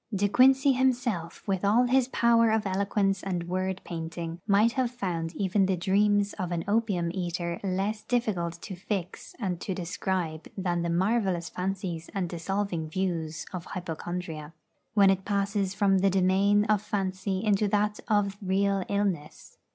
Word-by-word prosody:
De 205 Hz, -1 st, +1 dB
Quincey 265 Hz, +5 st, +5 dB
himself, 245 Hz, -10 st, 0 dB
with 190 Hz, -1 st, 0 dB
all 215 Hz, +5 st, +4 dB
his 250 Hz, 0 st, +3 dB
power 235 Hz, -2 st, +4 dB
of 220 Hz, -1 st, +1 dB
eloquence 195 Hz, 0 st, 0 dB
and 180 Hz, -3 st, -3 dB
word 185 Hz, +1 st, -1 dB
painting, 165 Hz, 0 st, -5 dB
might 210 Hz, +3 st, +4 dB
have 255 Hz, -1 st, 0 dB
found 175 Hz, -8 st, -3 dB
even 195 Hz, 0 st, +2 dB
the 190 Hz, -1 st, +1 dB
dreams 205 Hz, +3 st, +2 dB
of 180 Hz, -2 st, -2 dB
an 170 Hz, -1 st, -1 dB
opium 205 Hz, -6 st, +1 dB
eater 175 Hz, -2 st, -3 dB
less 200 Hz, +3 st, -1 dB
difficult 185 Hz, -9 st, -1 dB
to 200 Hz, -, -6 dB
fix 185 Hz, -1 st, -5 dB
and 185 Hz, -7 st, -3 dB
to 190 Hz, -, -3 dB
describe 175 Hz, -2 st, -3 dB
than 175 Hz, -2 st, 0 dB
the 170 Hz, -, -1 dB
marvellous 185 Hz, -1 st, +1 dB
fancies 180 Hz, -3 st, -4 dB
and 185 Hz, -3 st, -1 dB
dissolving 175 Hz, -1 st, -2 dB
views 165 Hz, -3 st, -2 dB
of 180 Hz, -2 st, -5 dB
hypochondria, 165 Hz, -2 st, -5 dB, 0.4 s
when 200 Hz, -2 st, +6 dB
it 190 Hz, 0 st, -1 dB
passes 200 Hz, -1 st, -1 dB
from 195 Hz, -2 st, +3 dB
the 195 Hz, +1 st, +3 dB
domain 195 Hz, +2 st, +3 dB
of 210 Hz, -2 st, +2 dB
fancy 190 Hz, -2 st, -2 dB
into 210 Hz, 0 st, +3 dB
that 210 Hz, +1 st, +1 dB
of 205 Hz, -3 st, +1 dB
real 195 Hz, 0 st, +1 dB
illness. 195 Hz, -7 st, -3 dB
195 Hz, 155 wpm, -28 LUFS, 175-205 Hz, 0.4 s, when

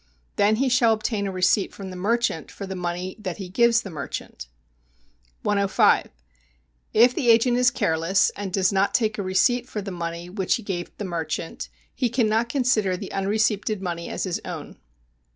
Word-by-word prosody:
Then 205 Hz, +2 st, +3 dB
he 265 Hz, +4 st, +1 dB
shall 245 Hz, -3 st, +4 dB
obtain 215 Hz, -2 st, -2 dB
a -, -, -3 dB
receipt 185 Hz, +2 st, +1 dB
from 195 Hz, -2 st, -7 dB
the -, -, -8 dB
merchant 210 Hz, -3 st, 0 dB
for 200 Hz, -, -7 dB
the 190 Hz, 0 st, -6 dB
money 180 Hz, +1 st, -4 dB
that 185 Hz, -4 st, -5 dB
he 190 Hz, -3 st, -7 dB
gives 235 Hz, +4 st, +3 dB
the 195 Hz, -, -7 dB
merchant. 140 Hz, -, -6 dB, 1.0 s
105. 200 Hz, -1 st, +3 dB, 0.8 s
If 240 Hz, +3 st, +5 dB
the 245 Hz, -1 st, 0 dB
agent 240 Hz, +2 st, +5 dB
is 250 Hz, 0 st, +5 dB
careless, 165 Hz, 0 st, +1 dB
and 200 Hz, -2 st, -6 dB
does 185 Hz, 0 st, +2 dB
not 195 Hz, +1 st, +2 dB
take 215 Hz, -3 st, +1 dB
a -, -, +1 dB
receipt 215 Hz, +6 st, +1 dB
for 215 Hz, -, -4 dB
the 195 Hz, -, -5 dB
money 170 Hz, -1 st, -5 dB
which 190 Hz, 0 st, 0 dB
he 235 Hz, -, -6 dB
gave 175 Hz, -4 st, -4 dB
the 205 Hz, -, -4 dB
merchant, 165 Hz, -2 st, -4 dB, 0.2 s
he 250 Hz, -, 0 dB
cannot 230 Hz, -1 st, +1 dB
consider 230 Hz, -8 st, +1 dB
the 195 Hz, -, -7 dB
unreceipted 210 Hz, +1 st, 0 dB
money 170 Hz, -3 st, -4 dB
as -, -, -3 dB
his 185 Hz, -3 st, -2 dB
own. -, -, -8 dB
200 Hz, 180 wpm, -24 LUFS, 180-225 Hz, 1.0 s, If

